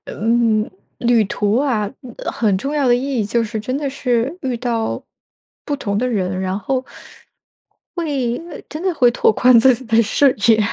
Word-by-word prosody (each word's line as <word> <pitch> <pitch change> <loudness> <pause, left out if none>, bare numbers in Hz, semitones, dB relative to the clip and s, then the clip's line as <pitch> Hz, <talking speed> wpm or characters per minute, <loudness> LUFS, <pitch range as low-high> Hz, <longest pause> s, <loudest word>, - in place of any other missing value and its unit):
嗯， 225 0 +1 0.3
旅 235 -2 +3
途 205 +2 0
啊， 235 -8 0 0.3
呃， - - -3
很 210 -4 +1
重 275 +10 -3
要 285 -3 +1
的 240 - +5
意 260 +1 -1
义 210 - 0
就 230 +3 0
是 220 0 -4
真 255 +4 -3
的 285 -1 -2
是 250 +1 -1
遇 255 -2 -1
到 230 -2 -2 0.6
不 290 - -2
同 200 -7 -2
的 250 - 0
人， 190 -5 -1
然 190 0 -2
后 260 +5 -2 1.1
会 275 -8 -1
呃， 300 - -8
真 305 - -6
的 370 -2 0
会 250 -5 +4
拓 240 - +3
宽 245 +2 +5
自 255 +2 +6
己 255 - -10
的 225 -1 +3
视 265 +6 +3 0.2
野。 225 -1 +6
240 Hz, 200 characters per minute, -19 LUFS, 215-265 Hz, 1.1 s, 自